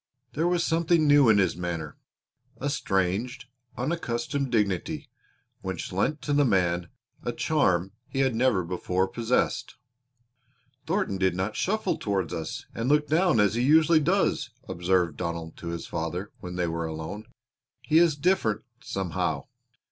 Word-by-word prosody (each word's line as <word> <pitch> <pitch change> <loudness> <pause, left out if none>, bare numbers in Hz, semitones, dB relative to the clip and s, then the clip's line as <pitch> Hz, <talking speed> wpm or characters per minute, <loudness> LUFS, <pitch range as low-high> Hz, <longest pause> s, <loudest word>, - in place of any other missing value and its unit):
There 160 +3 +1
was 175 -1 +2
something 165 -1 +2
new 145 -4 +6
in 110 - +6
his 95 -4 +2
manner 85 -3 -4 0.6
a 145 +1 -2
strange, 100 +1 -1 0.3
unaccustomed 135 -2 -2
dignity 100 -6 -1 0.5
which 95 -3 -4
lent 125 +11 0
to 145 - -1
the 145 0 +4
man 90 -7 +1 0.3
a - - -2
charm 90 +1 +1 0.2
he 135 - -1
had 130 -2 +2
never 115 -5 +2
before 90 +1 0
possessed. 120 +3 -1 1.1
"Thornton 180 - 0
did 95 -2 +2
not 95 +4 -2
shuffle 215 -1 0
toward 95 -5 -1
us 80 - -5
and 115 +3 -2
look 150 0 +3
down 165 -3 +3
as 105 -1 +4
he 120 - 0
usually 155 +4 +5
does," 175 -5 +1 0.2
observed 90 -3 +1
Donald 85 -2 -4
to 85 - -8
his 85 0 -4
father 85 +4 -4
when 90 0 -7
they 90 -1 0
were 85 0 -2
alone. 80 +7 -6 0.6
"He 155 +1 +4
is 170 -3 +4
different, 140 - +1 0.2
somehow. 95 -7 -2
105 Hz, 150 wpm, -27 LUFS, 90-145 Hz, 1.1 s, new